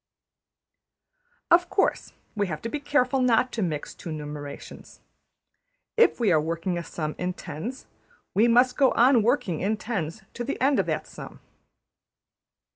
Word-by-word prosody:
Of 350 +1 +5
course, 395 - 0 0.2
we 205 -1 0
have 155 -3 -4
to 230 - -3
be 295 - -3
careful 275 -2 +1
not 250 0 +3
to 225 - -3
mix 155 -6 -3
two - - -9
numerations. 150 -2 -8 1.0
If 460 - +4
we 225 -5 +3
are 155 -3 +4
working 165 +3 -2
a - - -5
sum 155 -2 -4
in 180 0 -1
tens, 205 - -7 0.5
we 220 +4 +4
must 245 +2 +4
go 270 -2 +4
on 245 0 +5
working 230 - 0
in 215 +3 0
tens 205 -4 -4
to 240 - -4
the 265 - -4
end 275 +1 +3
of - - 0
that - - -2
sum. - - -11
220 Hz, 155 wpm, -26 LUFS, 165-255 Hz, 1.0 s, Of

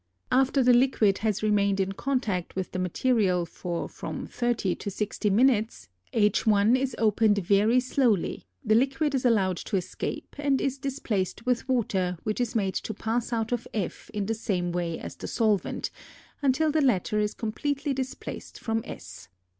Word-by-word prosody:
After 265 +1 +3
the 250 0 +6
liquid 240 -5 +3
has 215 -1 -1
remained 200 -2 +2
in 190 0 +1
contact 210 -6 -2
with 190 -1 -3
the 185 - -3
material 185 -1 +1
for 170 0 -4
from - - -6
thirty 240 -6 0
to - - -4
sixty 210 +1 -2
minutes, 220 - +2 0.2
H_ 210 +1 +3
is 260 -1 -1
opened 215 -1 +3
very 205 +5 +3
slowly, 250 -6 +1 0.2
the 215 - +3
liquid 275 +5 +2
is 260 -2 0
allowed 195 -7 +3
to 200 - -2
escape 180 - -5
and 280 -2 +2
is 275 0 -1
displaced 240 - -2
with 250 +1 0
water 190 -8 0
which 215 +3 -1
is 245 -1 -2
made 195 -4 +1
to 220 - -4
pass 230 +3 -2
out 225 -1 -1
of 240 -1 -2
F 200 -5 -4
in 205 -2 -2
the 225 - 0
same 185 -5 -1
way 170 -1 -2
as - - -8
the - - -7
solvent, 215 -4 0 0.5
until 290 +3 +2
the 310 +1 +2
latter 215 -5 +2
is 210 0 0
completely 280 +6 -2
displaced 265 0 -6
from 225 -1 -1
S. 90 0 -9
220 Hz, 170 wpm, -27 LUFS, 195-255 Hz, 0.5 s, the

